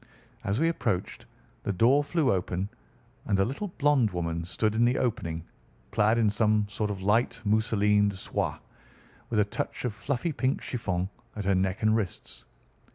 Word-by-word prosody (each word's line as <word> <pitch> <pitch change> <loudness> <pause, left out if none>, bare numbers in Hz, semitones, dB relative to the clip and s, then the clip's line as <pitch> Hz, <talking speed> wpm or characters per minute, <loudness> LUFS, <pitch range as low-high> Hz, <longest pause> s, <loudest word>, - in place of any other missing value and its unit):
As 105 +2 0
we 165 - +3
approached, 110 - -2 0.3
the - - -2
door 125 +9 +4
flew 155 -2 +1
open, 95 +1 -2 0.6
and 100 - +2
a 95 - +3
little 140 - -3
blonde 145 - +2
woman 85 -2 -3
stood 110 +4 0
in 115 +2 +2
the 125 +2 +3
opening, 85 -10 -1 0.5
clad 110 +2 +3
in 115 -2 +3
some 105 0 +2
sort 105 +1 -2
of 95 -2 -4
light 115 +4 +2
mousseline 105 -1 +3
de 100 - -6
soie, 95 - -2 0.7
with 110 - +1
a 105 - +4
touch 105 - -4
of 120 - -1
fluffy 125 +9 -2
pink 135 -2 0
chiffon 95 -7 -2 0.3
at 105 -2 -4
her 100 - +3
neck 95 +2 0
and 110 0 +4
wrists. 100 -6 -4
105 Hz, 170 wpm, -28 LUFS, 95-120 Hz, 0.7 s, door